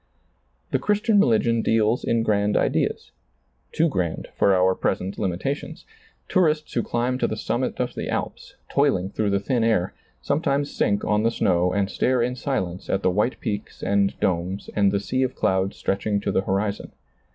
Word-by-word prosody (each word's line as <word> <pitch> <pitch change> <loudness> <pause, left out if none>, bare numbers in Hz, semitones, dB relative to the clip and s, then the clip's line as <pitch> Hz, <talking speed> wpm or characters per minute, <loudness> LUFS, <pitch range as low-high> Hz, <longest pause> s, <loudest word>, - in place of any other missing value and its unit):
The - - +1
Christian 210 0 +2
religion 115 - +3
deals 110 +1 +2
in 115 -1 +1
grand 105 -1 +1
ideas; - - 0 0.6
too 165 - +2
grand 90 - -2
for - - +3
our 95 0 +3
present 95 +1 -2
limitations. 100 - -3 0.4
Tourists 155 -5 +1
who 120 - +1
climb 120 +3 -1
to - - +2
the - - -4
summits - - -2
of - - -1
the - - -5
Alps, - - -4
toiling 115 -10 +1
through 105 -1 -1
the 100 0 +1
thin 120 +3 0
air, 105 -5 +1 0.3
sometimes 140 - 0
sink 100 -1 +1
on 105 0 +2
the 115 - +3
snow 90 -5 +1
and 100 +1 +1
stare 125 +4 +1
in 125 +1 -1
silence 95 -10 -3
at 95 - 0
the - - +3
white 105 +7 0
peaks 105 -1 -5
and 100 0 +1
domes 95 0 -1
and 100 -2 +3
the 100 - +1
sea 115 +7 -2
of 130 -1 0
clouds 95 +1 0
stretching 100 +1 -1
to - - -1
the - - +2
horizon. 100 +1 -2
105 Hz, 175 wpm, -24 LUFS, 95-125 Hz, 0.6 s, religion